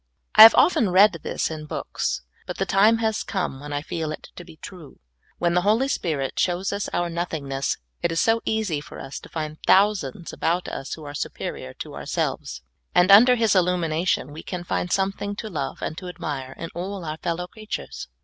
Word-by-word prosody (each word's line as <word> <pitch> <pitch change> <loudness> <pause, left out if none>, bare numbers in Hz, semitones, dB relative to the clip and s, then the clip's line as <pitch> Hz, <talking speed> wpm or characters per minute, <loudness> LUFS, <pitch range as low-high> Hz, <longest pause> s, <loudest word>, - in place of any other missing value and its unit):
I 215 - +8
have 225 +1 +12
often 230 - +4
read 185 -1 +5
this - - -2
in 155 -1 -7
books, 65 - -3 0.2
but - - -5
the - - 0
time 215 +4 +4
has 220 -1 0
come 180 -9 -3
when 145 +1 -8
I 145 0 -2
feel 160 -1 -3
it 155 - -8
to 175 - -9
be 160 - -15
true. 170 -3 -11 0.4
When 170 0 +1
the 180 - +3
Holy 220 +7 +2
Spirit 150 - -2
shows 185 +2 0
us 200 0 -3
our 175 0 -1
nothingness, 160 -6 -2 0.2
it 170 - 0
is 165 - 0
so 225 0 +3
easy 210 -9 -1
for - - -11
us 135 0 -7
to - - -14
find 155 -1 -5
thousands 190 -6 +2
about 175 +2 -1
us 135 - -5
who 160 - -12
are 145 -1 -7
superior 65 - -5
to - - -8
ourselves, 65 0 -3 0.3
and 180 +2 +5
under 245 +5 +8
His 225 -4 +2
illumination 175 -4 +1
we 155 +2 -8
can 180 -2 -5
find 175 +1 -2
something 195 +1 -1
to 215 +1 -6
love 140 -5 -4
and 155 - -3
to 185 - -8
admire 140 -7 -5
in 165 - -6
all 185 +1 -5
our 155 0 -4
fellow 175 +1 -3
creatures. 215 +3 -7
175 Hz, 200 wpm, -24 LUFS, 155-200 Hz, 0.4 s, have